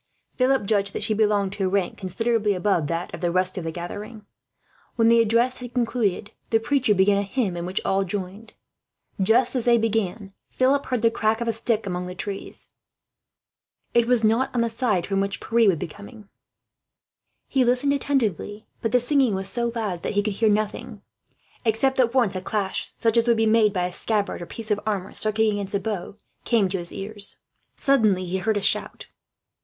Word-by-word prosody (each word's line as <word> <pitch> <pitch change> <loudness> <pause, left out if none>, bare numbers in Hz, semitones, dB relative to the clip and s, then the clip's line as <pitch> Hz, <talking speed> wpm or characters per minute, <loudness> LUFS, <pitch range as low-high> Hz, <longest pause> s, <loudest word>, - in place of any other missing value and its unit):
Philip 260 -3 +2
judged 200 -1 +1
that - - -3
she 220 0 +2
belonged 205 -2 +1
to 200 -2 -2
a - - +1
rank 190 -2 0
considerably 210 +2 0
above 180 -5 +1
that 170 +2 -3
of - - -7
the 175 - +1
rest 185 +1 0
of 185 - -4
the 165 - -3
gathering. 205 +6 -7 0.7
When 230 -1 +4
the 230 0 +5
address 230 +3 +2
had 245 0 -9
concluded, 230 -5 0 0.2
the 225 - +3
preacher 255 -2 +1
began 200 +1 +4
a - - +1
hymn 200 -2 -1
in 170 0 -4
which 185 - -1
all 195 0 +2
joined. 195 +3 -6 0.7
Just 230 +6 +3
as 245 - -1
they 240 -1 +5
began, 215 -3 -1 0.2
Philip 275 +2 +1
heard 250 -3 -1
the 230 - +4
crack 220 0 0
of 235 - -3
a 230 - +1
stick 225 0 -1
among 180 -1 -3
the 180 - -7
trees. 195 +1 -6 1.3
It 235 -1 +3
was 245 -2 +3
not 230 +5 +3
on 240 - +2
the 230 -1 0
side 225 -7 0
from 195 -1 0
which 200 0 -2
Pierre 230 -2 +3
would 180 - +2
be - - -4
coming. 205 +5 -13 1.2
He 265 -2 +2
listened 250 +3 +2
attentively, 220 - -1 0.2
but 225 - -1
the 250 - +6
singing 255 -3 +2
was 190 0 -3
so 235 +1 -1
loud 205 -7 -3
that - - -3
he 205 0 +1
could 210 0 -1
hear 220 +2 +2
nothing; 215 +1 -2 0.6
except 240 +4 +1
that 250 -1 +2
once 235 -7 +2
a 185 - -3
clash, 195 0 -3
such 225 0 +1
as 230 +1 +3
would 235 -1 +4
be 225 - +2
made 215 -1 +4
by 180 -2 -1
a 180 - -4
scabbard 210 -3 -1
or 170 - -7
piece 225 -1 -7
of 205 - +2
armour 200 -4 -3
striking 215 0 +1
against 205 -1 -3
a - - +2
bough, 200 -2 -4 0.3
came 225 -5 +2
to 190 0 -2
his 170 0 -6
ears. 205 +1 -3 0.4
Suddenly 215 -10 +2
he 185 +2 -2
heard 220 +2 0
a - - -1
shout. - - -1
215 Hz, 205 wpm, -24 LUFS, 195-235 Hz, 1.3 s, the